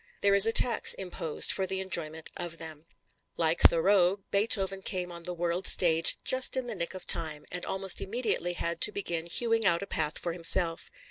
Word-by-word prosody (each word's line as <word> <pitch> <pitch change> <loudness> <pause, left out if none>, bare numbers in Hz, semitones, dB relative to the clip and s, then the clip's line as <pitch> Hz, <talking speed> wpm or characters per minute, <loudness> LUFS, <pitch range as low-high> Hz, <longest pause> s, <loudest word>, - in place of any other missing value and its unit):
There 200 - +1
is 200 +2 +8
a - - +1
tax 230 0 +4
imposed 175 -4 0
for 190 -1 -1
the 190 +1 -5
enjoyment 160 -4 -2
of 170 -1 -7
them. 160 -1 -11 0.5
Like 165 0 -1
Thoreau, 190 +2 +2
Beethoven 195 -2 +2
came 180 -2 -5
on 170 -1 -9
the 180 - -6
world's 175 +2 0
stage 165 -2 +3
"just 260 0 0
in 260 - -4
the 240 - -7
nick 180 -1 -6
of 185 - -10
time," 155 -3 -1
and 180 0 -6
almost 195 -1 0
immediately 195 -5 -4
had 170 -1 -5
to 210 - +5
begin 170 -5 -5
hewing 225 +5 -1
out 170 -2 +1
a - - -7
path 155 -5 -3
for 170 - -5
himself. 165 0 +2
180 Hz, 195 wpm, -26 LUFS, 165-200 Hz, 0.5 s, is